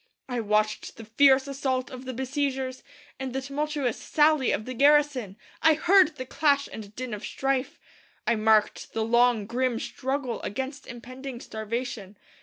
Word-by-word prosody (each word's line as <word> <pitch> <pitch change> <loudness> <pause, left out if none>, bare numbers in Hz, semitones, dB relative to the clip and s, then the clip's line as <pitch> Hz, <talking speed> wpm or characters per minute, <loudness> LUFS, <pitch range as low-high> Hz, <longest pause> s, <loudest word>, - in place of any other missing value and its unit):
I 245 -2 -2
watched 215 0 0
the 225 - -9
fierce 265 +4 +4
assault 265 -2 -2
of 255 0 -9
the 260 - -4
besiegers 265 0 -2 0.4
and 265 -1 -4
the 265 - -2
tumultuous 280 -2 -2
sally 300 -4 +3
of 215 - -2
the 255 - -5
garrison. 280 -6 +3 0.2
I 320 -1 +5
heard 355 +1 +4
the 255 - -6
clash 280 0 +2
and 210 -1 -9
din 255 -2 -5
of 210 0 -6
strife. 270 +2 -2 0.5
I 235 - +3
marked 215 -1 +2
the 225 -1 -1
long, 235 -2 +3
grim 240 +1 -1
struggle 265 -2 -3
against 265 +5 -5
impending 255 +1 -8
starvation. 220 -3 -5
255 Hz, 155 wpm, -26 LUFS, 230-275 Hz, 0.5 s, I